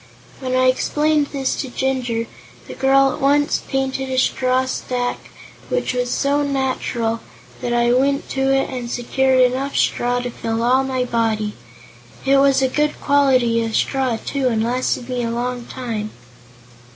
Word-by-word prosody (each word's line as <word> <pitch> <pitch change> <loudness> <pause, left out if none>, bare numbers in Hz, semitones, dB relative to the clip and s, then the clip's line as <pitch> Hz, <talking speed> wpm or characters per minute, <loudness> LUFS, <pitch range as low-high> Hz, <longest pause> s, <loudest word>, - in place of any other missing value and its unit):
When 255 -1 -2
I 255 0 +3
explained 295 +3 +2
this 270 -2 -2
to 265 - -4
Jinjur, 245 -3 -1 0.4
the - - -7
girl 270 0 +3
at - - -7
once 290 +1 +2
painted 265 0 -2
a 260 - -2
straw 255 0 +2
stack 250 -1 -3 0.4
which - - -1
was 245 0 -1
so 285 +3 +1
natural 260 -5 -1 0.4
that 245 - -2
I 240 0 +3
went 275 +2 +1
to 270 0 0
it 270 0 +2
and 245 -2 -5
secured 260 +2 +1
enough 260 +2 +1
straw 245 0 +1
to 245 0 -4
fill 225 0 -3
all 255 +3 +3
my 260 -1 -1
body. 220 -3 0 0.7
It 275 0 +4
was 275 -1 +4
a - - +4
good 295 +3 -1
quality 255 -5 +3
of 225 -1 -3
straw, 260 -4 0
too, 270 +3 -2
and 225 -3 +1
lasted 245 0 -1
me 250 -1 -2
a 230 - -2
long 245 +1 -3
time." 225 -5 -4
255 Hz, 165 wpm, -20 LUFS, 240-270 Hz, 0.7 s, It